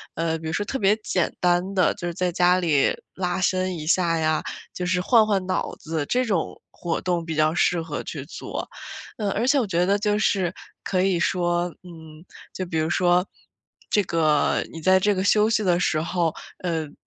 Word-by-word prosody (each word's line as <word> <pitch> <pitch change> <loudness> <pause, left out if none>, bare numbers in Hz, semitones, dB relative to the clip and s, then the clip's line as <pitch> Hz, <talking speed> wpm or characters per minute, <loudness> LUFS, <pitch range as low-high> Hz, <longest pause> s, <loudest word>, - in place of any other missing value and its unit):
呃， 165 0 -1
比 160 - -11
如 160 - -3
说 205 - 0
特 270 - -3
别 205 -2 +3
简 180 -5 0
单 180 +2 +1
的， 185 -2 +3
就 175 -4 -5
是 175 - -3
在 180 +1 -1
家 180 +1 +3
里 155 -6 +2 0.2
拉 180 0 -2
伸 185 0 0
一 155 -1 -7
下 170 -1 +2
呀， 155 0 +1 0.3
就 180 - -4
是 180 0 +1
换 225 +3 +5
换 200 -3 0
脑 - - -1
子， 160 -2 -3
这 255 +1 +1
种 195 -8 -2
活 170 -2 -3
动 175 -2 -1
比 160 -1 -4
较 155 +1 +2
适 175 -1 +2
合 160 -2 -5
去 140 -3 -6
做。 155 - -6 0.5
呃， 210 -2 -1
而 235 +5 -1
且 280 0 +4
我 240 - +1
觉 175 -1 +1
得 200 +2 +2
就 210 0 0
是 185 -4 +1 0.3
可 185 -2 0
以 185 -2 +2
说 175 -1 +1 0.2
嗯， 160 -2 -12 0.3
就 185 - -4
比 170 -2 -3
如 155 +1 0
说 180 +1 +3 0.6
这 205 - +3
个 155 -4 +2
你 165 - -8
在 185 +3 +5
这 205 +2 +2
个 185 - -1
休 210 +2 +4
息 215 -1 +1
的 175 -3 +2
时 155 -3 +1
候 170 -1 0 0.3
嗯， 160 -4 -3
180 Hz, 220 characters per minute, -24 LUFS, 165-190 Hz, 0.6 s, 换